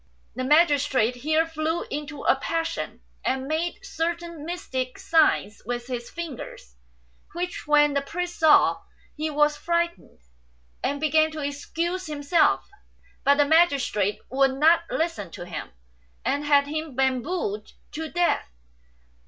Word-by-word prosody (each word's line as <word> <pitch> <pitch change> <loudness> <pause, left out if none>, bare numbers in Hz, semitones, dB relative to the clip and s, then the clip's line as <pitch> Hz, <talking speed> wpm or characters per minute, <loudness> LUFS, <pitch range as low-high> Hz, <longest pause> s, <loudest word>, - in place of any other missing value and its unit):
The 255 - -3
magistrate 285 -5 +3
here 310 +5 +2
flew 325 +1 -2
into 295 0 -5
a - - +4
passion, 330 +4 -3 0.2
and 260 +1 -1
made 325 +3 -2
certain 335 -1 -3
mystic 260 -8 -4
signs 310 -10 +2
with 240 +2 -4
his 240 -2 -5
fingers, 285 - -8 0.6
which 355 -1 -4
when 295 -1 +5
the 280 - +1
priest 350 +5 -5
saw 315 -2 +5 0.3
he 310 +1 -2
was 295 0 +2
frightened, 340 0 -2 0.7
and 285 +1 -1
began 310 +1 +3
to 305 -2 -5
excuse 335 +6 -3
himself; 300 +2 +2 0.6
but 280 - +5
the 290 - +5
magistrate 280 - +3
would 270 0 +3
not 325 +4 +4
listen 320 - -2
to 175 - -7
him, 170 -3 -6 0.6
and 285 +1 0
had 285 -1 +4
him 310 -1 -4
bambooed 260 - -1 0.2
to 320 +1 -5
death. 350 - +1
300 Hz, 130 wpm, -25 LUFS, 270-330 Hz, 0.7 s, when